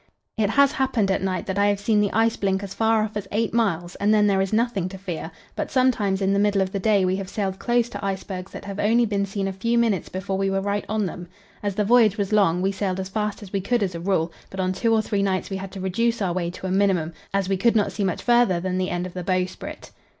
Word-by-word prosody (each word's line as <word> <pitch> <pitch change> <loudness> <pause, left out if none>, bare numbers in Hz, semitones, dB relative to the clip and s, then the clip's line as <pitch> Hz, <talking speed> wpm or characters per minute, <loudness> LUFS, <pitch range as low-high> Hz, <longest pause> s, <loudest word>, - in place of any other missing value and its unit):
It 215 -3 +1
has 280 +4 +4
happened 245 -7 +1
at 190 - 0
night 190 -1 -2
that 190 +1 -2
I 205 - +4
have 205 -1 +1
seen 210 +1 +2
the 205 - +1
ice 225 +1 +2
blink 195 0 0
as 195 -1 -6
far 225 -1 +2
off 215 0 -5
as 205 -2 -4
eight 220 +1 0
miles, 180 -7 0
and 205 +1 +2
then 210 -1 +4
there 195 -2 +3
is 195 - -1
nothing 220 -5 0
to 190 - -8
fear; 175 -4 -5 0.3
but - - -3
sometimes 215 -7 +2
in 195 +1 +2
the 200 - +2
middle 205 -1 +2
of 190 -1 0
the 200 - -2
day 200 -1 +3
we 185 +1 +1
have 195 -1 -5
sailed 195 -3 -3
close 240 -1 +1
to - - -7
icebergs 190 -1 -4
that - - -9
have 200 0 -6
only 230 +3 +3
been 200 -2 -1
seen 195 0 -2
a 195 - -3
few 230 +5 0
minutes 220 -7 +1
before 190 +1 -3
we 195 0 +1
were 195 0 0
right 200 +1 -2
on 215 -1 0
them. 175 0 -6 0.3
As 205 -2 -2
the 210 - +1
voyage 225 -2 +5
was 200 0 -1
long, 185 -4 +3
we 195 - +2
sailed 190 -1 -2
as 190 0 -4
fast 210 +1 -3
as 195 - -12
we 195 - 0
could, 235 +3 +1
as 185 -2 -2
a 170 - -5
rule; 170 -2 0 0.2
but 190 - -8
on 185 0 0
two 225 +5 0
or 220 -1 +3
three 205 -1 -1
nights 195 0 -1
we 195 - -2
had 190 0 -7
to 195 - -7
reduce 230 +6 0
our 190 -4 0
way 175 -1 -1
to 180 - -8
a 185 - -2
minimum, 185 -4 +1 0.2
as 195 -1 0
we 195 - +1
could 230 +5 +2
not 210 -2 +2
see 205 - -3
much 185 -3 -1
farther 240 -7 +4
than 185 +1 -2
the 185 - -1
end 175 0 -2
of 185 - -8
the 180 - -5
bowsprit. 185 0 -3
195 Hz, 285 wpm, -24 LUFS, 185-215 Hz, 0.3 s, voyage